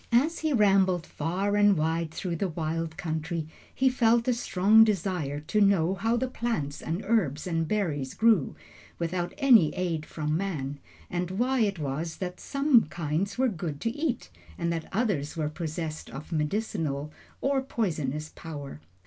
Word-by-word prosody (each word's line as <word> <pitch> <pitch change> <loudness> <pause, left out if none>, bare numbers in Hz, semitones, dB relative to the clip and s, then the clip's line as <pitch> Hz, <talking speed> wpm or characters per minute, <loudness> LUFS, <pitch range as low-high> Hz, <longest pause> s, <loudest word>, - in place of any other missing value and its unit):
As 285 +8 +3
he 315 -1 0
rambled 195 - +3
far 185 +6 -1
and 205 -2 +5
wide 160 +1 0
through 170 +2 -4
the 195 - 0
wild 160 0 -3
country, 160 -1 -3 0.2
he 265 - +1
felt 235 -2 +3
a 250 - +4
strong 220 -1 +5
desire 180 -8 -1
to 210 +8 0
know 190 -3 +4
how 225 +4 0
the 260 - 0
plants 225 - -3
and 170 +6 -3
herbs 175 - +1
and 165 -3 -1
berries 155 -10 -1
grew, 220 -10 +3 0.4
without 175 +1 -2
any 240 - +6
aid 170 -4 -2
from 150 -1 -2
man, 150 -7 -3 0.3
and 175 0 -1
why 250 +7 +1
it 205 -4 +1
was 155 +2 -3
that 180 -1 -5
some 275 - +3
kinds 165 +5 -2
were 260 +1 +3
good 160 - -4
to 230 - 0
eat, 275 - -2 0.3
and 170 - 0
that 165 -1 -5
others 190 - -1
were 155 -2 0
possessed 155 0 -5
of 150 +5 -9
medicinal 150 -3 -1 0.3
or 275 0 +1
poisonous 155 - -2
power. 145 - -8
175 Hz, 160 wpm, -28 LUFS, 155-220 Hz, 0.4 s, any